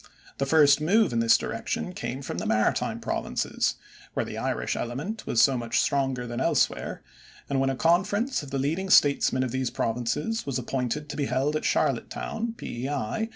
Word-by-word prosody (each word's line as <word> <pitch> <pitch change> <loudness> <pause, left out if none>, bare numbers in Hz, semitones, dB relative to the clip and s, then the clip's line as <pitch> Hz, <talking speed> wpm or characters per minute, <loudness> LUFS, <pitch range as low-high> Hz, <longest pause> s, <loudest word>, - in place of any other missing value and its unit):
The 140 - 0
first 145 -1 +5
move 195 - +3
in 115 - +1
this 115 0 +5
direction 180 - -3
came 135 -5 -5
from - - -4
the - - -3
Maritime 110 0 +1
Provinces, - - -1 0.4
where - - 0
the - - -7
Irish - - -2
element 150 - -4
was 115 - +4
so 135 - +4
much 120 -1 0
stronger 135 -3 0
than 120 0 -4
elsewhere, - - 0 0.4
and 140 - 0
when 135 0 +2
a 135 - -1
conference 200 - +1
of 145 - -9
the 135 - -2
leading 160 +8 -1
statesmen 140 -5 +4
of 130 - -2
these 130 -1 -1
Provinces 120 - -1
was 135 -2 -2
appointed 130 +3 -2
to - - -5
be 145 - 0
held 135 +4 0
at 155 - -2
Charlottetown, 225 +1 -1
P.E.I. 135 - -3
135 Hz, 180 wpm, -26 LUFS, 125-160 Hz, 0.4 s, first